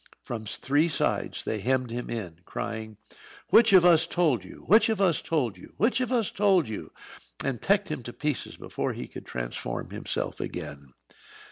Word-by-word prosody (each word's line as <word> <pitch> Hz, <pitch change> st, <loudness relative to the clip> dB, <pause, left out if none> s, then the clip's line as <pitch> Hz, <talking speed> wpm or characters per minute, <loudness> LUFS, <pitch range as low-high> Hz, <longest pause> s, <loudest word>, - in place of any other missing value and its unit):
From 110 Hz, -2 st, -5 dB
three 145 Hz, +9 st, +1 dB
sides 150 Hz, -, -1 dB
they 110 Hz, -, -2 dB
hemmed 125 Hz, +2 st, 0 dB
him 120 Hz, +1 st, -4 dB
in, 90 Hz, -8 st, -5 dB
crying, 110 Hz, +1 st, -5 dB, 0.5 s
"Which 230 Hz, -1 st, +7 dB
of 185 Hz, -3 st, +7 dB
us 170 Hz, -1 st, +6 dB
told 165 Hz, -9 st, +1 dB
you?" -, -, -12 dB
"Which 220 Hz, +6 st, +5 dB
of 220 Hz, -3 st, 0 dB
us 185 Hz, -5 st, +3 dB
told 125 Hz, -, -1 dB
you?" -, -, -14 dB
"Which 235 Hz, +3 st, +2 dB
of 255 Hz, -, -1 dB
us 235 Hz, -5 st, +1 dB
told 195 Hz, -, +3 dB
you?" 110 Hz, -, -6 dB, 0.5 s
and 135 Hz, -4 st, -2 dB
pecked 200 Hz, -1 st, +2 dB
him 150 Hz, -4 st, -3 dB
to 120 Hz, -, -7 dB
pieces 150 Hz, -3 st, -3 dB
before -, -, -3 dB
he -, -, -6 dB
could -, -, -10 dB
transform -, -, -4 dB
himself -, -, -3 dB
again. 70 Hz, -3 st, -7 dB
140 Hz, 175 wpm, -27 LUFS, -, 0.5 s, Which